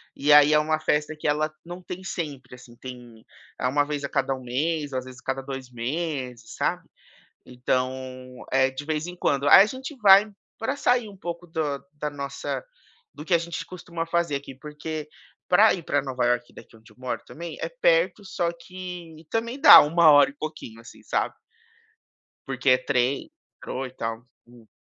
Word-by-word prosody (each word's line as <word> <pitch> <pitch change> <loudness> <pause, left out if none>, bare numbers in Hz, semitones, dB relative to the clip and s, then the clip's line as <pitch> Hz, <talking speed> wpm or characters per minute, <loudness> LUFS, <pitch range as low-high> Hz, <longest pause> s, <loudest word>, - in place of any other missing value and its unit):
e 145 +2 +1
aí 150 +1 +7
é 150 - +6
uma 155 0 0
festa 155 0 0
que 155 - -3
ela 155 +1 +1
não 175 +1 -8
tem 180 +1 -8
sempre, 145 -9 -6
assim, 120 -1 -16
tem 120 -2 -11 0.3
é - - -3
uma 145 +2 +2
vez 145 -1 -4
a 140 - -3
cada 135 -1 0
1 130 - -11
mês, 145 +4 -2
às 130 0 -3
vezes 130 0 -11
a - - -38
cada 135 0 -2
2 135 -2 -7
meses, 125 -2 -4
sabe, - - -1 0.6
então 130 0 -3
é 130 0 +3
de 130 +2 -6
vez 155 0 -2
em 180 - -7
quando. 140 -4 0
Aí 190 - +10
a 200 - +6
gente 265 +4 -7
vai 205 -1 +7 0.3
pra 245 +5 -1
sair 245 -5 +1
um 200 - -12
pouco 170 0 -6
da 155 -4 -2
da 150 0 -4
nossa 140 - -5 0.5
do - - -9
que 180 - 0
a 170 - +7
gente 170 0 -5
costuma 170 -2 -6
fazer 170 -3 0
aqui, 140 -1 -7
porque 150 +2 -7 0.4
pra 205 +5 +6
ir 175 - -9
pra - - 0
Nova 130 -3 -2
Iorque 120 0 0
daqui - - -15
onde 110 0 -19
eu - - -21
moro 125 0 -4
também 170 0 -8
é - - -2
perto, - - +1
só 175 -2 -1
que 175 -1 -9
e 160 - -16
também 235 +4 -2
dá - - +12
1 160 +2 +5
hora 145 -1 +6
e - - -21
pouquinho, 150 -7 -7
assim, 115 - -15
sabe. - - -1 1.1
Porque 135 -1 0
é 125 - +6
trem, 130 +1 0 0.2
metrô 130 +1 -5
e 130 - -10
tal. 115 -1 -5 0.2
Hum. 120 -2 -18
150 Hz, 195 wpm, -25 LUFS, 130-170 Hz, 1.1 s, dá